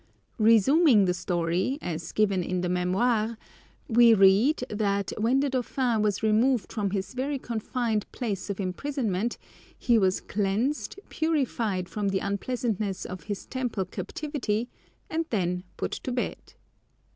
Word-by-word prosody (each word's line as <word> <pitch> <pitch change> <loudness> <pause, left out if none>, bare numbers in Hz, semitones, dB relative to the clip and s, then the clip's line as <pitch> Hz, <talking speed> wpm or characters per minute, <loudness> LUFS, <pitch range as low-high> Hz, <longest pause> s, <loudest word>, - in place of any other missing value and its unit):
Resuming 230 - +5
the 180 - +2
story, 175 +7 -1
as 165 - -5
given 200 -3 +2
in 180 +1 -2
the 180 - -1
Mémoires, 215 +6 +1 0.5
we 235 0 +6
read, 205 +9 +5
that 200 -3 -1
when 245 +5 +3
the 285 - +1
dauphin 250 -2 0
was 210 0 0
removed 220 +1 +2
from 210 -3 -1
his 195 +3 -3
very 275 +3 -2
confined 230 -2 -2
place 210 -6 -4
of 200 - -3
imprisonment 220 +1 -2 0.4
he 235 -3 +3
was 190 -2 +2
cleansed, 215 - -1
purified 240 - -1
from 205 +1 -2
the 195 - 0
unpleasantness 200 -1 -2
of 185 0 -7
his 205 -2 -5
Temple 245 -7 -2
captivity, 235 - -3 0.4
and 325 0 -2
then 180 -3 -1
put - - -2
to 255 - -4
bed. 245 0 -4
215 Hz, 135 wpm, -27 LUFS, 190-250 Hz, 0.5 s, we